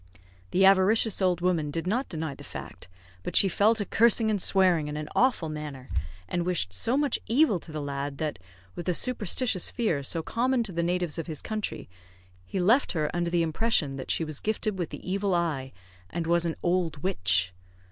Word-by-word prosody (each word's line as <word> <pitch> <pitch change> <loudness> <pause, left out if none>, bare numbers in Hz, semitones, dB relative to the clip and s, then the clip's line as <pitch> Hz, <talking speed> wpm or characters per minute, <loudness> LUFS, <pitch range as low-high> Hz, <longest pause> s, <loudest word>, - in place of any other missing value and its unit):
The 190 +1 +3
avaricious 195 +2 +4
old 180 -2 +2
woman 170 -4 +1
did 165 +3 -3
not 235 +9 -1
deny 160 -4 -3
the - - -12
fact, - - -9 0.3
but - - -5
she 195 - +6
fell 205 +4 +3
to 210 -2 -2
cursing 225 0 +3
and 205 -3 0
swearing 180 -6 +3
in 150 0 -4
an 150 0 -5
awful 245 -10 +2
manner, 150 -4 -7 0.4
and 175 - -1
wished 170 - -1
so 230 - +1
much 290 -3 +1
evil 235 - +3
to 160 - -12
the 155 -1 -4
lad, 140 0 -4
that, 150 -9 -3 0.3
with 175 - -7
the 180 - +1
superstitious 225 -3 0
fear 215 - -1
so 160 +4 +2
common 245 +4 +1
to 215 - -3
the 170 -1 -1
natives 175 -1 -1
of 165 - -5
his 155 -3 -5
country, 215 -1 -4 0.6
he 190 - -4
left 225 +10 +3
her 155 -3 -1
under 175 -1 0
the 170 -1 +2
impression 160 -4 +1
that 130 - -7
she - - +1
was 155 -2 -6
gifted 215 -2 -2
with 175 - -2
the - - -9
evil 195 0 0
eye, 150 -6 -1 0.4
and 170 0 -3
was 170 +1 +2
an 165 - -1
"owld 175 -4 0
witch." 95 - +1
175 Hz, 200 wpm, -27 LUFS, 155-205 Hz, 0.6 s, she